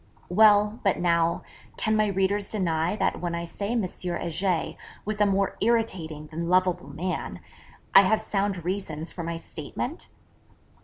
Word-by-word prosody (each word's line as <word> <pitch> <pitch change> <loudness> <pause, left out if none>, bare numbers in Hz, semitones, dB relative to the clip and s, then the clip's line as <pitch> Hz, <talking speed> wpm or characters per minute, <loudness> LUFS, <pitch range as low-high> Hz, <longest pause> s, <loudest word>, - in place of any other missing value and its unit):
Well, 210 +2 +5
but 195 -3 +2
now, 170 -1 +2 0.3
can 220 0 +1
my 215 0 +3
readers 195 +1 +1
deny 170 -3 0
that - - 0
when 175 -1 -2
I 170 0 -3
say 200 +6 -3
M. 235 -3 +1
Heger 175 -1 -1 0.3
was 210 0 -2
a 210 - +5
more 195 -1 +1
irritating 190 -10 0
than 165 +2 -4
lovable 180 -5 +2
man, 175 +6 -4 0.5
I 195 - +10
have 215 +3 +3
sound 195 -4 -2
reasons 175 -4 -3
for 175 - -5
my 165 0 -3
statement? 165 - -6
185 Hz, 150 wpm, -26 LUFS, 170-205 Hz, 0.5 s, I